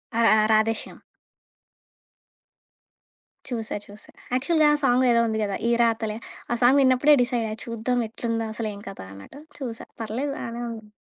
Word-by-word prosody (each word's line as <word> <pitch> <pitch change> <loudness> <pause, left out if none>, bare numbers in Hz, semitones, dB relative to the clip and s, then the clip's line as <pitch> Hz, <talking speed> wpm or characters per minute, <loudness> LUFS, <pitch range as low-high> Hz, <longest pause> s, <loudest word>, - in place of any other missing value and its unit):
ఆ! - - +1
రా - - +6
రా 215 - +3
రాధేశ్యామ్. 220 +1 0 2.5
చూసా. 225 -3 -3
చూసా. 205 +1 -11 0.2
యాక్చువల్‌గా 305 +4 +3
ఆ - - +4
సాంగ్ 255 0 +4
ఏదో 235 0 +4
ఉంది 220 0 -1
గదా 200 -1 -2
'ఈరాతలే.' 230 -2 +1 0.3
ఆ - - +2
సాంగ్ 265 +3 +6
విన్నప్పుడే 265 +3 +5
డిసైడ్ 240 -2 -1
అయ్యా 215 - -5
చూద్దాం 235 +2 -1
ఎట్లుందో 230 0 -3
అసలు 225 -1 -3
ఏం 200 - -10
కథా 195 - -9
అన్నట్టు 100 - -12 0.2
చూసా, 235 -4 -5 0.2
పర్లేదు 250 +6 -3
బానే 235 +1 -5
ఉంది. 220 -2 -9
230 Hz, 150 wpm, -24 LUFS, 220-250 Hz, 2.5 s, రా